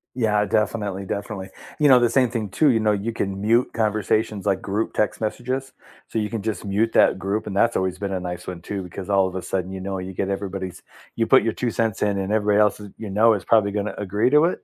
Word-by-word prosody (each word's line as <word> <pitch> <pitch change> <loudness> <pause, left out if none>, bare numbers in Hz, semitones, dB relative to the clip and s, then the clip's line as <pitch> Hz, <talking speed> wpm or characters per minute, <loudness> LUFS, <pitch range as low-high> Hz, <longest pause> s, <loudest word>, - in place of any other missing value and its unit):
Yeah. 105 -4 +2
Definitely. 100 -1 -1
Definitely. 100 -1 -5 0.3
You 150 -1 +5
know, 130 -2 +8
the 120 -1 +3
same 125 +1 +3
thing 115 -3 -3
too. 145 - +3
You 115 -4 +3
know, 110 -1 +2
you 105 +3 -1
can 100 -3 -3
mute 115 +4 +2
conversations 110 -1 0
like 95 -2 +1
group 105 +3 -2
text 105 - 0
messages. 130 +5 -3 0.4
So, 115 - -2
you 105 -1 -2
can 115 -4 -4
just 110 -5 -3
mute 105 +3 +1
that - - +4
group, 100 +3 -2
and 100 - -4
that's 115 +3 +3
always 95 -1 -1
been 100 0 -4
a 95 - -1
nice 90 0 -6
one 90 -2 -6
too, 100 +2 -5
because 90 +2 -8
all 95 -1 +3
of 95 - -7
a 95 - -3
sudden, 90 +1 -3
you 95 - -5
know, 95 0 -3
you 95 0 -6
get 95 +1 -2
everybody's 95 -2 -4 0.3
you 115 - +1
put - - +6
your 115 0 0
2 120 0 -2
cents 110 -2 -1
in 100 -1 +1
and 95 +1 -2
everybody 105 -1 +2
else 105 -1 +2
is 105 -1 -9
you 110 - -6
know 110 +3 +4
is 100 -4 -3
probably 105 -1 +3
gonna 105 +1 -3
agree 105 +4 +1
to 150 +3 +5
it, 175 - -1
105 Hz, 255 wpm, -23 LUFS, 95-115 Hz, 0.4 s, know